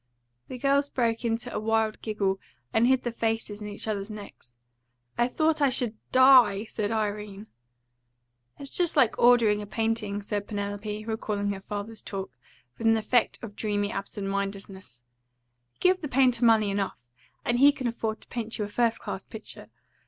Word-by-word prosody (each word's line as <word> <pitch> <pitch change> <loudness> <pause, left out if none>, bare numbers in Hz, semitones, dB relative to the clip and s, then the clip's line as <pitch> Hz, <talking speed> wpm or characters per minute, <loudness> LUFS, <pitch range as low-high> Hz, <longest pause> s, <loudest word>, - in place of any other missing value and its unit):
The 255 - -7
girls 280 +2 +2
broke 230 -3 0
into 230 -1 -2
a - - -1
wild 220 0 0
giggle, 200 -3 -1 0.3
and 230 +2 +4
hid 260 0 +3
their 240 - -2
faces 225 -2 -2
in 210 - -5
each 205 +1 -4
other's 200 -1 -2
necks. 200 - -11 0.6
"I 240 - +2
thought 310 +4 +1
I 280 - +5
SHOULD 245 -3 0 0.2
die," 255 -6 +6
said 215 -1 -3
Irene. 210 -2 -3 1.1
"'It's 275 -1 -6
just 350 -2 +1
like 250 -6 +3
ordering 235 -4 +5
a 205 - -7
painting,'" 220 -2 -1
said 205 0 -3
Penelope, 205 0 -4
recalling 210 -2 -2
her 195 - -4
father's 210 +2 -6
talk, 195 -1 -5 0.5
with 225 - 0
an 225 0 +5
effect 220 +2 +1
of 205 -3 -8
dreamy 205 -1 -1
absent 195 0 -4
mindedness. 195 -9 -4 0.7
"'You - - -40
give 365 0 +3
the 300 - -3
painter 250 -3 +3
money 220 -3 +4
enough, 195 -1 -2 0.5
and 240 0 +1
he 285 +2 +8
can 270 -2 -7
afford 225 -2 -2
to - - -18
paint 230 -2 -4
you 210 - -1
a - - -8
first 230 +1 +1
class - - -6
picture. - - -10
220 Hz, 175 wpm, -27 LUFS, 205-240 Hz, 1.1 s, he